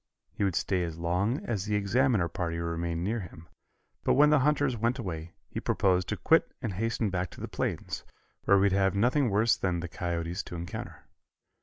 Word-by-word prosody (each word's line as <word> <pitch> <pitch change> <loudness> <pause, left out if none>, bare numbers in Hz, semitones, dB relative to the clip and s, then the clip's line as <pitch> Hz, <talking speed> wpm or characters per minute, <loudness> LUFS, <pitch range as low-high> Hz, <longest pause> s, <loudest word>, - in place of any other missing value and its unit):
He 105 +3 -3
would 95 -4 +1
stay 95 -1 +1
as 85 -2 -4
long 90 - 0
as 105 -5 -2
the 105 0 0
Examiner 105 -1 +2
party 85 -1 -3
remained 85 0 -2
near 110 +5 -1
him, 85 -3 -10 0.6
but - - +3
when 150 +2 +6
the 150 - +5
hunters 145 -2 +2
went 115 +3 0
away 85 -7 -5
he - - -5
proposed 90 -2 +1
to - - -1
quit - - +3
and 110 - -3
hasten 110 +1 -1
back 90 -1 -1
to - - -13
the - - -4
plains, - - -3 0.4
where 100 - +6
he - - +3
would 100 0 +4
have 95 0 +2
nothing 125 +5 +3
worse 110 +3 +3
than 90 -3 -1
the 85 - -4
coyotes 85 +1 -3
to 90 - -9
encounter. 85 +1 -6
95 Hz, 200 wpm, -29 LUFS, 85-115 Hz, 0.6 s, when